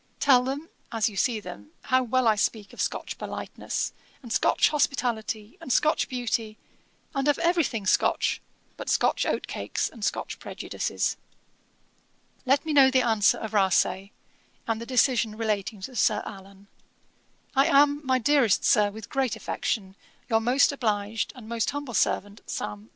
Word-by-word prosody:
Tell 255 Hz, -3 st, +5 dB
them, 280 Hz, +5 st, -4 dB, 0.2 s
as 225 Hz, -2 st, +1 dB
you 205 Hz, -, -12 dB
see 230 Hz, +2 st, +1 dB
them, 105 Hz, -, -10 dB
how 255 Hz, 0 st, +3 dB
well 255 Hz, 0 st, +1 dB
I 220 Hz, -, +6 dB
speak 210 Hz, 0 st, -2 dB
of -, -, -5 dB
Scotch -, -, -3 dB
politeness, -, -, -4 dB, 0.3 s
and 235 Hz, -2 st, -5 dB
Scotch -, -, +3 dB
hospitality, 235 Hz, -7 st, -1 dB
and 255 Hz, -, -5 dB
Scotch 305 Hz, +5 st, +2 dB
beauty, 230 Hz, -3 st, -2 dB, 0.6 s
and 275 Hz, 0 st, -1 dB
of 290 Hz, -, +3 dB
every 345 Hz, 0 st, +2 dB
thing 225 Hz, -7 st, -3 dB
Scotch, -, -, +2 dB, 0.4 s
but -, -, -6 dB
Scotch -, -, +2 dB
oat -, -, -1 dB
cakes, -, -, -3 dB
and 225 Hz, -, -11 dB
Scotch -, -, -2 dB
prejudices. -, -, -3 dB, 1.3 s
'Let 275 Hz, +3 st, +3 dB
me 315 Hz, -, -1 dB
know 275 Hz, -2 st, +7 dB
the 260 Hz, -1 st, +3 dB
answer 220 Hz, -3 st, +3 dB
of 220 Hz, -1 st, -6 dB
Rasay, 190 Hz, -1 st, +2 dB, 0.6 s
and 225 Hz, 0 st, -2 dB
the 235 Hz, -, -7 dB
decision 240 Hz, -4 st, +2 dB
relating 210 Hz, -2 st, -2 dB
to 250 Hz, +7 st, -7 dB
Sir 215 Hz, -3 st, +2 dB
Allan. 195 Hz, 0 st, -11 dB, 0.9 s
'I 270 Hz, +3 st, +4 dB
am, 290 Hz, -1 st, +4 dB
my 260 Hz, -1 st, +2 dB
dearest 250 Hz, -4 st, +3 dB
Sir, 210 Hz, -1 st, +4 dB
with 210 Hz, 0 st, -9 dB
great 265 Hz, -4 st, -1 dB
affection, 195 Hz, -3 st, -3 dB, 0.3 s
'Your 225 Hz, -1 st, +3 dB
most 250 Hz, +6 st, +3 dB
obliged, 215 Hz, -5 st, -1 dB
and 240 Hz, -4 st, -11 dB
'Most 230 Hz, -1 st, -1 dB
humble 285 Hz, -3 st, -5 dB
servant, 205 Hz, 0 st, 0 dB
'SAM. 105 Hz, +1 st, -5 dB
230 Hz, 160 wpm, -26 LUFS, 210-265 Hz, 1.3 s, know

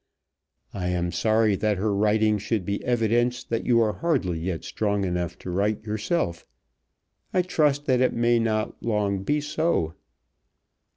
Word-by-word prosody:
I 90 Hz, -2 st, -3 dB
am 90 Hz, -1 st, -1 dB
sorry 110 Hz, +3 st, +2 dB
that 105 Hz, 0 st, 0 dB
her 105 Hz, +2 st, 0 dB
writing 105 Hz, +1 st, +2 dB
should 105 Hz, -2 st, -2 dB
be 100 Hz, +2 st, -3 dB
evidence 120 Hz, +1 st, +1 dB
that 115 Hz, -, -3 dB
you 120 Hz, -2 st, +4 dB
are 110 Hz, -2 st, +2 dB
hardly 130 Hz, -, -1 dB
yet 85 Hz, 0 st, -3 dB
strong 100 Hz, -2 st, -1 dB
enough 90 Hz, -1 st, -2 dB
to 90 Hz, -, -7 dB
write 100 Hz, +4 st, 0 dB
yourself. 105 Hz, -, -2 dB, 0.9 s
I 180 Hz, -, +4 dB
trust 150 Hz, -5 st, +1 dB
that 130 Hz, -4 st, +2 dB
it 130 Hz, -, +3 dB
may 120 Hz, 0 st, +3 dB
not 110 Hz, -1 st, -1 dB
long 105 Hz, -4 st, 0 dB
be 145 Hz, +9 st, 0 dB
so. 150 Hz, -, 0 dB
110 Hz, 155 wpm, -25 LUFS, 95-120 Hz, 0.9 s, you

